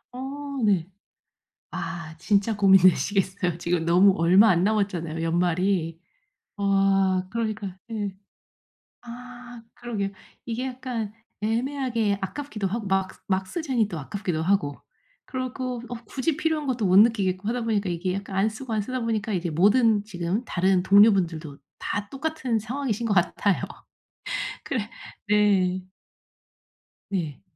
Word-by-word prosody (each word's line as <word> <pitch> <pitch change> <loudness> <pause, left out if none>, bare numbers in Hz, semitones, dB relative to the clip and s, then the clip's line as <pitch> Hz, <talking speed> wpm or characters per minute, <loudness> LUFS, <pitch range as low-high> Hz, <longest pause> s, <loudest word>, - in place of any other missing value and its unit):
어 - - -6 0.4
네. 190 -5 +2 0.8
아 170 -3 -5
진짜 205 +4 +1
고민되시겠어요. 190 -1 +3
지금 170 -1 -1
너무 185 +3 +6
얼마 185 +6 +6
안 180 +1 +3
남았잖아요 175 -7 -1
연말이. 175 0 +1 0.6
아 195 -2 +2
그러니까 215 -4 -3 0.2
예. 205 -3 -3 0.9
아 245 0 -10
그러게요. 215 -5 -3 0.4
이게 240 +2 -3
약간 245 -5 -4 0.3
애매하게 230 -2 0
아깝기도 215 0 -4
하고 215 +2 -3
막 190 0 +1 0.2
막 190 0 0
쓰자니 260 - 0
또 170 - -6
아깝기도 160 +1 -3
하고 165 -7 +1 0.5
그리고 255 -1 -4
어 245 - -6
굳이 280 +5 -2
필요한 310 -2 -1
것도 240 -5 0
못 185 +1 +5
느끼겠고 205 -3 +3
하다 240 +1 -1
보니까 210 -4 0
이게 180 +2 -2
약간 195 0 -5
안 200 +3 +3
쓰고 225 +2 -6
안 215 - +1
쓰다 255 +5 -3
보니까 225 -2 -1
이게 175 -3 -1
모든 210 +5 +4
지금 190 +2 -3
다른 185 -3 +1
동료 205 +3 +7
분들도 165 -6 -2 0.2
다 205 0 -3
똑같은 275 -5 -2
상황이신 235 -1 -2
것 205 - +2
같아요. 185 +2 +1 1.0
그래 225 -4 -3 0.4
네. 190 -3 +2 1.2
네. 165 -8 -3
200 Hz, 275 characters per minute, -25 LUFS, 185-230 Hz, 1.2 s, 동료